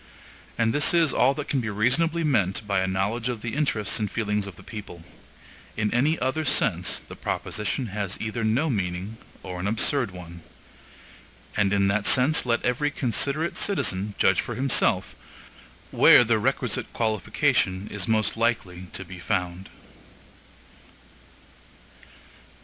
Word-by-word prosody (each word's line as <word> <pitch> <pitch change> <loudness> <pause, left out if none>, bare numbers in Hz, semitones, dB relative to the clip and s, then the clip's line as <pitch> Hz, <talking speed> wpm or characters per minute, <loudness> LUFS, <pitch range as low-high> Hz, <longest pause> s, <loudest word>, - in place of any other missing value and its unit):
And 115 -1 +1
this 150 +4 +3
is 165 -5 +3
all 135 +2 +3
that 150 0 -5
can 140 - 0
be 115 - -3
reasonably 145 +11 +1
meant 100 - 0
by 100 -2 0
a 95 - 0
knowledge 105 +6 -1
of 120 -3 -4
the 115 0 -5
interests 110 -10 0
and 105 -2 -1
feelings 105 -3 -2
of 95 - -9
the - - -15
people. 100 -6 -9 0.7
In 105 -1 0
any 145 +7 +2
other 130 +5 -1
sense 105 - +1
the - - -10
proposition 105 +5 -3
has 100 -2 -4
either 110 +1 -3
no 115 +9 +1
meaning, 95 - -3 0.3
or 90 -2 -6
an 95 - -2
absurd 115 +3 +2
one. 85 -2 -11 1.1
And 100 -2 +2
in 100 -1 +2
that 100 +1 0
sense 130 +2 +4
let 120 -1 0
every 125 +4 +1
considerate 145 +4 -1
citizen 105 - -1
judge 95 -1 +3
for 120 - -6
himself 130 +1 +2 0.8
where - - +7
the 110 -1 +1
requisite 125 +1 -1
qualification 105 -3 0
is 100 -3 -3
most 110 -1 +1
likely 105 -6 -2
to 95 - -4
be 90 +1 -10
found. 90 -1 -3
110 Hz, 145 wpm, -25 LUFS, 95-125 Hz, 1.1 s, where